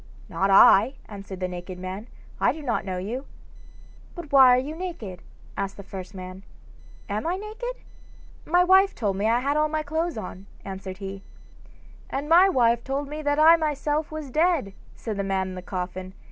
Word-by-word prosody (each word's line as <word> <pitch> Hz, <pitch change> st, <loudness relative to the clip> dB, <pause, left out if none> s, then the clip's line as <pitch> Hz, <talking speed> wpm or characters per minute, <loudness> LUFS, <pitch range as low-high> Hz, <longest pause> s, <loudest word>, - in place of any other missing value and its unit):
'Not 195 Hz, -, 0 dB
I,' 200 Hz, +5 st, +7 dB
answered 195 Hz, -2 st, -9 dB
the 185 Hz, -, 0 dB
naked 180 Hz, 0 st, -7 dB
man. 185 Hz, +4 st, -6 dB, 0.3 s
'I -, -, +3 dB
do 310 Hz, 0 st, -9 dB
not 240 Hz, -7 st, -1 dB
know 185 Hz, -2 st, -3 dB
you.' 230 Hz, +9 st, -5 dB, 0.9 s
'But 340 Hz, -4 st, -9 dB
why 270 Hz, -2 st, +8 dB
are 250 Hz, 0 st, +6 dB
you 290 Hz, +5 st, -5 dB
naked?' 320 Hz, -, -6 dB, 0.3 s
asked 195 Hz, 0 st, -4 dB
the 200 Hz, -, -9 dB
first 190 Hz, 0 st, -9 dB
man. 185 Hz, 0 st, -8 dB, 0.7 s
'Am 210 Hz, +8 st, -2 dB
I 350 Hz, -, 0 dB
naked? 440 Hz, +5 st, -6 dB, 0.6 s
My 355 Hz, +3 st, +3 dB
wife 380 Hz, +2 st, +5 dB
told 205 Hz, -4 st, -1 dB
me 200 Hz, +2 st, -1 dB
that 225 Hz, +1 st, +3 dB
I -, -, +2 dB
had 285 Hz, +3 st, 0 dB
all 305 Hz, 0 st, +2 dB
my 310 Hz, 0 st, -1 dB
clothes 315 Hz, 0 st, -2 dB
on,' 190 Hz, -1 st, -7 dB, 0.2 s
answered 190 Hz, -1 st, -7 dB
he. 195 Hz, 0 st, -7 dB, 0.9 s
'And 280 Hz, +2 st, -3 dB
my 350 Hz, +4 st, +6 dB
wife 235 Hz, -7 st, +2 dB
told 275 Hz, +1 st, -3 dB
me 305 Hz, +1 st, -5 dB
that 290 Hz, -1 st, 0 dB
I 320 Hz, +2 st, +7 dB
myself 300 Hz, 0 st, -1 dB
was 310 Hz, -4 st, -6 dB
dead,' 310 Hz, -, +1 dB, 0.2 s
said 220 Hz, -3 st, -5 dB
the 200 Hz, -, -1 dB
man 190 Hz, -1 st, -1 dB
in -, -, -7 dB
the 180 Hz, -, -7 dB
coffin. 185 Hz, 0 st, -5 dB
240 Hz, 190 wpm, -25 LUFS, 195-310 Hz, 0.9 s, why